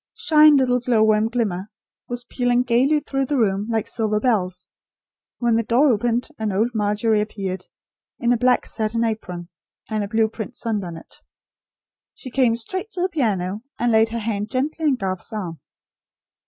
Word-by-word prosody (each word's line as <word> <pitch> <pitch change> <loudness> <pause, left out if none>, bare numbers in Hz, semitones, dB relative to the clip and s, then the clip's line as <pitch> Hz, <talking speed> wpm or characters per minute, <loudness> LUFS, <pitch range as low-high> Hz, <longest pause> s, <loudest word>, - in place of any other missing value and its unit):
"Shine 305 -2 +6
little 250 -2 +2
glowworm 220 -3 +3
glimmer" 210 -5 -2 0.4
was 245 0 -4
pealing 245 0 +1
gaily 260 +5 +2
through 270 -2 -2
the 290 - 0
room, 205 -3 +1
like 225 -2 0
silver 215 -2 -1
bells, 185 -7 0 0.7
when 235 -2 +2
the 230 - +3
door 255 +6 +4
opened, 235 +3 0
and 215 -2 -1
old 220 +5 +1
Margery 210 0 +1
appeared, 195 -3 -4 0.5
in 240 -2 +2
a - - +1
black 250 +2 +2
satin 225 +1 -1
apron, 180 -6 -4 0.4
and 215 -1 0
a - - -3
blue 220 +1 +2
print 220 -2 -7
sunbonnet. 190 -8 -4 1.0
She 255 - -9
came 250 -3 +3
straight 370 - -5
to 360 - -3
the 370 - +1
piano, 210 - -1 0.2
and 240 0 +1
laid 220 0 +4
her 230 - -4
hand 210 -2 -2
gently 295 +5 -2
on 280 - +3
Garth's 190 -6 -4
arm. 180 -7 -5
225 Hz, 165 wpm, -22 LUFS, 210-250 Hz, 1.0 s, Shine